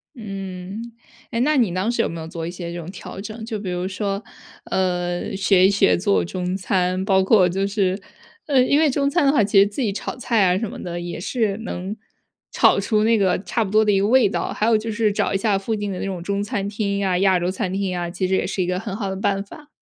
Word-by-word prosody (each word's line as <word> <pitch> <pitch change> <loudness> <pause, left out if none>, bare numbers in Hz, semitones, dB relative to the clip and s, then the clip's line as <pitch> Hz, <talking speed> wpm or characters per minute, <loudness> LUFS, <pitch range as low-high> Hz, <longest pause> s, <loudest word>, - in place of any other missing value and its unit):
嗯， 195 +1 -7 0.4
哎， 230 - -1
那 295 +5 +3
你 230 -9 +2
当 185 +5 0
时 235 -1 +1
有 - - 0
没 165 - -6
有 160 - -6
做 165 -1 -5
一 170 - -4
些 175 -1 -6
这 175 - -5
种 170 0 -7
调 190 0 -9
整？ 220 +2 -7
就 225 -1 -4
比 200 -2 -5
如 180 +1 -2
说， 200 +1 -3 0.4
呃， 180 -1 -1
学 190 -1 +5
一 - - +3
学 200 - +3
做 200 +2 +2
中 180 +1 -3
餐。 185 0 0
包 190 -1 +3
括 190 -2 +5
就 195 +2 -1
是， 195 -2 0 0.5
呃， 275 -4 +4
因 280 +3 +3
为 315 -1 +4
中 280 +1 +1
餐 345 -1 +2
的 275 - +5
话， 270 - +3
其 200 0 +1
实 200 - +7
自 205 +6 -4
己 215 - +1
炒 - - -5
菜 230 -4 +2
啊 180 0 +3
什 230 - -3
么 - - -8
的， 175 -1 -4
也 175 0 -5
是 210 +1 -1
能 195 -2 -5 0.6
炒 - - +4
出 215 -2 +1
那 230 0 +4
个 190 -3 +1
差 230 - 0
不 195 - -5
多 215 +1 +5
的 210 - +3
一 195 - +3
个 200 - +2
味 250 0 +5
道， - - -2
还 215 - 0
有 225 -1 +4
就 225 +1 -4
是 215 -1 +1
找 - - 0
一 - - +2
下 200 0 +1
附 195 +3 -3
近 205 -1 -3
的 185 - -4
那 - - -3
种 185 -3 -4
中 200 +2 -2
餐 205 -3 -2
厅 200 -1 -2
呀， 190 -2 +1
亚 190 -1 +4
洲 175 +1 -1
餐 185 -1 -2
厅 190 -2 -2
啊， 175 -1 -3
其 180 +1 -2
实 190 - +1
也 - - 0
是 190 0 -2
一 175 - 0
个 180 0 0
很 205 -1 -5
好 200 -3 -3
的 190 - -3
办 195 0 0
法。 295 +8 -13
195 Hz, 290 characters per minute, -22 LUFS, 185-220 Hz, 0.6 s, 实